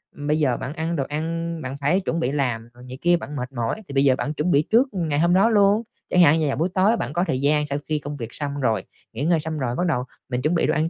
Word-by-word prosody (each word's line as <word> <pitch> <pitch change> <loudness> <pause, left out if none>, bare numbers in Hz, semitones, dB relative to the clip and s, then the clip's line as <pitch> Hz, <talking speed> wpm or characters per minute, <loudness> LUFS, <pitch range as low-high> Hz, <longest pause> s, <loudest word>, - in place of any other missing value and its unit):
bây 150 +2 -1
giờ 130 -5 +2
bạn 140 - -5
ăn 165 +1 -2
đồ 140 - 0
ăn, 165 +2 -3
bạn 130 +2 -5
phải 145 +7 +2
chuẩn 170 -3 -2
bị 135 -5 0
làm 120 -5 -1
rồi 125 - -15
này 130 +1 -8
kia 175 0 +4
bạn 150 -3 -7
mệt 125 -1 -4
mỏi, 120 - -3
thì 140 - -8
bây 135 0 +3
giờ 135 -2 +4
bạn 145 +3 -3
chuẩn 155 +4 -1
bị 145 -1 +5
trước 245 +5 +5
ngày 160 -6 -1
hôm 170 +2 +3
đó 195 +5 +5
luôn. 205 0 +4 0.3
Chẳng 180 - +4
hạn 160 -1 +6
như 155 - +1
là 140 - 0
buổi 165 +6 0
tối 205 +4 +3
bạn - - -3
có 175 +2 +1
thời 130 +1 -1
gian 150 +1 +3
sau 140 -1 -2
khi 155 -1 -1
công 145 0 -6
việc 115 -2 -7
xong 145 -1 -4
rồi, 115 -3 +1 0.3
nghỉ 125 +6 -4
ngơi 170 0 +3
xong 155 0 -4
rồi, 125 -3 -1
bắt 180 - 0
đầu 125 -6 0 0.3
mình 125 0 -1
chuẩn 155 +5 +1
bị - - +2
đồ - - +2
ăn 155 +2 +1
150 Hz, 305 wpm, -23 LUFS, 135-170 Hz, 0.3 s, hạn